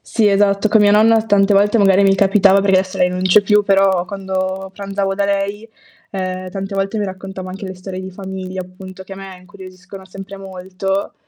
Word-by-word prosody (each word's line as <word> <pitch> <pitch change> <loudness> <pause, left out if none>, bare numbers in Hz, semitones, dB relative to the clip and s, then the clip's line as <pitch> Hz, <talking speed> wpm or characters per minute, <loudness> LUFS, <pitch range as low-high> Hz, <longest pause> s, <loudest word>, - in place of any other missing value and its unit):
Sì, 220 -3 +1
esatto, 200 +1 +2
con 220 0 +4
mia 205 0 +4
nonna 220 +1 +5
tante 200 -1 +3
volte 205 +3 +3
magari 195 -1 +4
mi 195 0 +4
capitava, 195 0 +4
perché 195 -1 +3
adesso 190 0 -4
lei 180 0 +3
non 180 0 -4
c'è 185 +3 +5
più, 210 +1 +3
però 195 -2 +2
quando 190 0 -4
pranzavo 195 0 -3
da 200 0 -1
lei, 200 +2 -2 0.4
ehm, 185 -1 -4
tante 195 +1 -6
volte 195 +3 -2
mi 205 - -1
raccontava 190 -1 -7
anche 195 +1 -7
le 185 - -7
storie 185 0 -8
di 190 0 -8
famiglia 190 -1 -7
appunto 185 +1 -12
che 195 - -12
a - - -13
me 195 -1 -10
incuriosiscono 190 0 -13
sempre 195 +1 -10
molto, 190 0 -4
195 Hz, 200 wpm, -17 LUFS, 185-200 Hz, 0.4 s, nonna